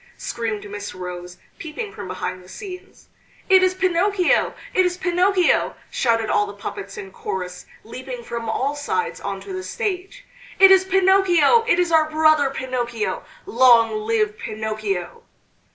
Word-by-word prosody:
screamed 220 -3 -4
Miss 205 -1 -7
Rose, 180 -1 -7 0.2
peeping 335 +7 -6
from - - -8
behind 185 - -5
the 180 - -17
scenes. 380 - -10 0.4
"It 380 -1 +7
is 370 0 +2
Pinocchio! 375 +1 +1 0.2
it 375 - +4
is 360 0 -1
Pinocchio!" 365 0 +2 0.2
shouted 230 -3 +1
all 205 0 +1
the 200 - -9
puppets 195 -1 -7
in 195 -1 -8
chorus, 180 -2 -6 0.2
leaping 250 +2 -8
from 230 -1 -5
all 265 +6 -1
sides 445 +11 -3
on - - -4
to 390 - -8
the 370 - -4
stage. 405 +4 -4 0.3
"It 385 0 +8
is 380 0 +6
Pinocchio! 385 +2 +4
It 345 - +3
is 355 -1 +1
our 315 -1 +4
brother 310 -2 +3
Pinocchio! 245 -4 -3 0.2
Long 235 -2 +5
live 215 -1 -1
Pinocchio!" 215 -4 -4
275 Hz, 150 wpm, -22 LUFS, -, 0.4 s, It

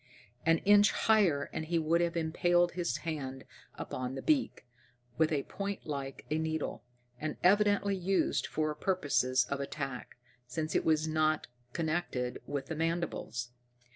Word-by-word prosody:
An 165 0 +6
inch 205 +1 +6
higher, 190 -11 +3
and 160 - -3
he 170 +1 0
would 165 +1 +2
have 170 0 0
impaled 175 +2 +2
his 175 -1 -1
hand 135 -5 -4 0.3
upon 130 +1 -4
the - - -5
beak, 285 - +1 0.5
with 160 0 +4
a 145 -3 +1
point 200 0 -5
like 140 -3 -5
a 155 - +1
needle, 160 -4 -2 0.4
and 155 -1 -3
evidently 205 +1 +4
used 190 +1 +1
for 155 -1 -1
purposes 145 -7 +1
of 140 - -1
attack, 135 -3 -5 0.3
since 155 +5 -3
it - - +1
was 155 0 +3
not 155 0 +1 0.3
connected 155 -6 -2
with 140 -2 -3
the 160 - -4
mandibles. 165 -7 -2
160 Hz, 145 wpm, -32 LUFS, 140-175 Hz, 0.5 s, An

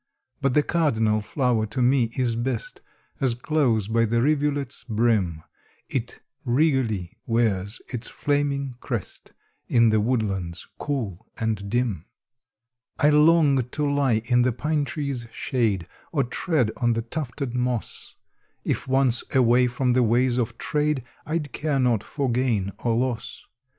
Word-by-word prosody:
But 135 -2 +1
the 150 - +5
cardinal 115 -11 +1
flower 120 -1 0
to 110 +5 -5
me 125 -1 +3
is 125 -3 +1
best 120 0 -3 0.4
As 130 -3 +1
close 120 -6 +1
by 115 +1 +2
the 115 +1 +1
rivulet's 145 -2 0
brim 105 -8 +1 0.5
It 120 -3 -4 0.2
regally 125 - +1
wears 110 -3 0
its 125 -2 -4
flaming 140 -2 -1
crest, 120 -7 -5 0.3
In 115 -1 +4
the 110 -1 +3
woodlands 100 -7 -1
cool 110 - -3
and 110 -3 -2
dim. 115 -7 -1 0.9
I 150 -1 +4
long 150 -2 +5
to 145 +5 -2
lie 130 -6 +2
in 120 0 +3
the 125 +1 +3
pine 150 +4 -1
tree's 140 -6 -4
shade, 105 -9 -1 0.2
Or 145 -4 +2
tread 130 - 0
on 120 -1 +2
the 115 0 -2
tufted 135 0 -4
moss; 125 -2 -3 0.5
If - - -2
once 130 -2 +3
away 125 0 +5
from 125 +1 0
the 130 - +3
ways 120 +2 +2
of 115 - -2
trade, 150 -3 0 0.2
I'd 155 -3 -2
care 150 +1 -1
not 120 -5 +2
for 140 +3 -2
gain 115 -6 0
or 115 -2 0
loss. 125 +1 -2
125 Hz, 140 wpm, -24 LUFS, 115-140 Hz, 0.9 s, the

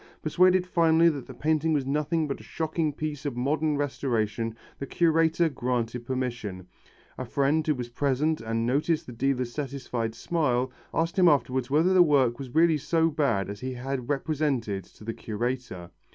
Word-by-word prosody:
Persuaded 180 +3 +4
finally 165 -1 +4
that 145 -5 -5
the - - -9
painting 160 +1 +1
was 140 -3 0
nothing 150 +3 0
but 140 - -4
a - - -12
shocking 160 -1 -2
piece 150 0 -5
of 140 -5 -4
modern 150 +4 0
restoration 115 -5 -1 0.2
the 140 - -5
curator 165 +1 +2
granted 125 -4 -2
permission. 120 -8 -3 0.5
A - - -2
friend 145 +5 +1
who 150 - +2
was 125 -2 -5
present 145 +5 0
and 115 0 -1
noticed 150 +6 +1
the - - -9
dealer's 125 0 -1
satisfied 130 -5 -3
smile, 130 -7 0 0.2
asked 165 +4 0
him 180 - +6
afterwards 130 -4 +2
whether 160 +6 +3
the 185 - +6
work 135 -7 +3
was 135 0 -8
really 160 -1 +4
so 165 +3 +1
bad 140 - +1
as 100 0 -7
he 130 +2 -4
had 125 0 -4
represented 135 - -1
to - - -17
the 115 +1 -4
curator. 110 -6 -4
140 Hz, 170 wpm, -27 LUFS, 120-155 Hz, 0.5 s, him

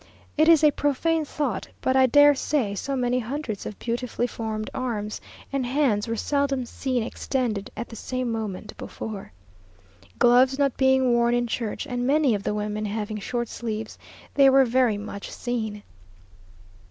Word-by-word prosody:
It 310 +2 +4
is 325 -2 +6
a 300 - +7
profane 310 +3 0
thought, 280 -8 -3
but 260 - 0
I 260 0 +6
dare 290 +3 +7
say 265 -6 -1
so 275 +7 -3
many 250 -1 +1
hundreds 245 -3 -4
of 210 - -7
beautifully 240 0 -2
formed 220 -3 -4
arms 215 -5 -3 0.3
and 275 -2 0
hands 245 -5 +1
were 230 - -1
seldom 275 +1 0
seen 255 -1 -2
extended 230 -4 -2
at 230 - -4
the 225 - -9
same 255 +1 -3
moment 215 -3 -5
before. 210 -3 -7 0.9
Gloves 250 +2 +5
not 280 -2 +1
being 265 -1 +3
worn 235 0 +3
in 240 0 +1
church, 230 +1 -3
and 245 -3 -2
many 285 -3 +3
of 205 - -1
the 210 - -2
women 210 0 -2
having 210 0 -3
short 240 +3 -3
sleeves, 220 -2 -5 0.3
they 275 -1 +6
were 270 0 +6
very 245 -3 +2
much 205 -1 -7
seen. 220 -4 -4
245 Hz, 165 wpm, -25 LUFS, 215-270 Hz, 0.9 s, a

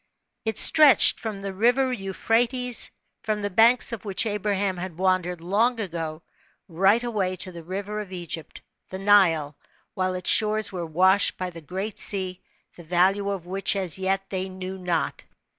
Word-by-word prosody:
It 220 - -2
stretched 300 -4 +6
from 215 -3 -6
the 195 0 -5
rive^ 250 +6 +1
Euphrates, 230 +4 0 0.3
from 215 -1 -2
the 205 0 -3
banks 230 +7 +4
of 230 - -6
which 200 +1 -1
Abraham 205 -2 -1
had 175 -2 -7
wandered 180 -2 0
long 225 +7 +1
ago, 165 -5 -5 0.4
right 195 +6 +2
away 200 -6 -2
to 185 +1 -5
the 170 -1 -10
river 200 +5 -5
of 205 -3 -8
Egypt, 170 -3 -7 0.3
the 190 - -6
Nile, 180 -7 +3 0.4
while 185 0 -2
its 180 -1 +2
shores 215 -1 +2
were 175 -3 -5
washed 185 +5 +2
by 185 -1 -4
the 165 -1 -11
Great 190 +7 -5
Sea, 185 -2 -2 0.3
the 175 - -13
value 185 +4 +1
of 195 -4 -4
which, 195 +2 0
as 190 -2 +2
yet, 195 +1 -1
they 190 0 -3
knew 185 0 -7
not. 175 -3 -2
190 Hz, 165 wpm, -24 LUFS, 180-210 Hz, 0.4 s, stretched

